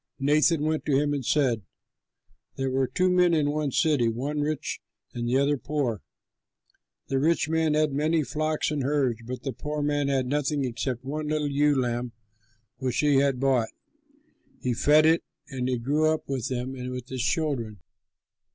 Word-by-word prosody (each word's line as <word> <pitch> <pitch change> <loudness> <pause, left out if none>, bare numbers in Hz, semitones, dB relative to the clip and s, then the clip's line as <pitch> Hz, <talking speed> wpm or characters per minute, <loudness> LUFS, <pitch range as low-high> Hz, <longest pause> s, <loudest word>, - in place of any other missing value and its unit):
Nathan 150 +3 +3
went 155 0 0
to 140 -3 +2
him 145 +1 +1
and 140 -2 -2
said, 125 -4 +1 0.9
"There 135 -1 -2
were 130 0 +1
two 185 +7 +1
men 180 -2 +4
in 145 -2 +2
one 150 -1 -1
city, 150 -4 +2
the - - +1
one 140 +6 -3
rich 150 0 -2 0.3
and 120 -1 -3
the 130 - +3
other 140 +1 +2
poor. 130 -5 -2 1.1
The 135 - +1
rich 160 +1 +2
man 160 -1 +1
had 155 -2 +2
many 155 +3 +1
flocks 155 +3 -1
and 150 -2 -1
herds; 135 -4 0
but 125 +1 -6
the 135 - -3
poor 150 0 -4
man 145 -1 0
had 135 -2 +1
nothing 145 +1 0
except 125 +1 -3
one 150 +2 -3
little 150 -1 -1
ewe 145 0 +3
lamb 120 -1 -2 0.6
which 130 -2 -2
he 145 -2 +3
had 135 -2 +2
bought. 130 -4 +2 0.9
He 125 - -1
fed 150 +6 +4
it, 165 +1 +4 0.3
and 130 -2 -3
it 125 -2 -2
grew 150 +4 +2
up 155 0 -1
with 130 -4 -2
him 130 0 -3
and 125 -1 -6
with 125 -1 -6
his 130 -1 -3
children. 130 -5 -1
140 Hz, 180 wpm, -26 LUFS, 130-150 Hz, 1.1 s, men